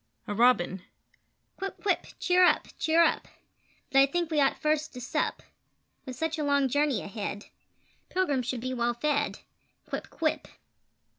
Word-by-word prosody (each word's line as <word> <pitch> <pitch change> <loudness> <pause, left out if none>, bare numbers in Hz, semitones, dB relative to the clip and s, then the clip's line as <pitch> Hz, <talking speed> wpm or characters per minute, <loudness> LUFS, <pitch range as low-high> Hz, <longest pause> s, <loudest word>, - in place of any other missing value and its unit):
[A 205 - -2
Robin]: 205 -5 +3 0.8
Quip! 390 0 -5
Quip! 395 -3 +1
Cheer 365 0 +4
up! 355 - +4
Cheer 325 +1 +4
up! - - +1 0.6
But 270 - +5
I 275 - +7
think 340 +2 -2
we 300 -2 +3
ought 275 - +2
first 305 0 0
to - - -6
sup; 250 - -2 0.6
With 255 - -5
such 320 +3 -2
a - - 0
long 280 -2 +2
journey 285 -1 +1
ahead, 205 0 -5 0.6
Pilgrims 285 -10 0
should 255 -3 -2
be 255 +1 -3
well 240 -1 0
fed 290 +3 -1 0.4
Quip! - - -5
Quip! 315 -2 -1
285 Hz, 155 wpm, -28 LUFS, 245-320 Hz, 0.8 s, I